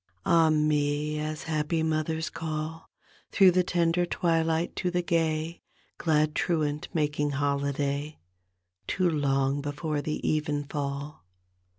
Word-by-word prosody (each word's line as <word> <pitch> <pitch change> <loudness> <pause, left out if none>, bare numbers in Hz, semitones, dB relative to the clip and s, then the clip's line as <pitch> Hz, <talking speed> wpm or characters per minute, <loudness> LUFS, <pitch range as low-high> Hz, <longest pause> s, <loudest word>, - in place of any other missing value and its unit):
Ak 165 -2 +5
me, 150 0 +1
as 155 0 -4
happy 160 +1 0
mothers 160 +1 -1
call 160 0 -5 0.4
Through 190 -2 +6
the 180 +1 +3
tender 175 0 +1
twilights 165 -1 0
to 180 - 0
the 175 0 0
gay. 165 -1 0 0.4
Glad 155 -2 +2
truant 150 -4 0
making 150 -2 0
holiday 140 +1 -1 0.7
Too 185 -1 +1
long 140 -3 +1
before 145 +1 -2
the 155 +1 -3
evenfall. 145 -1 -2
155 Hz, 110 wpm, -28 LUFS, 145-165 Hz, 0.7 s, Through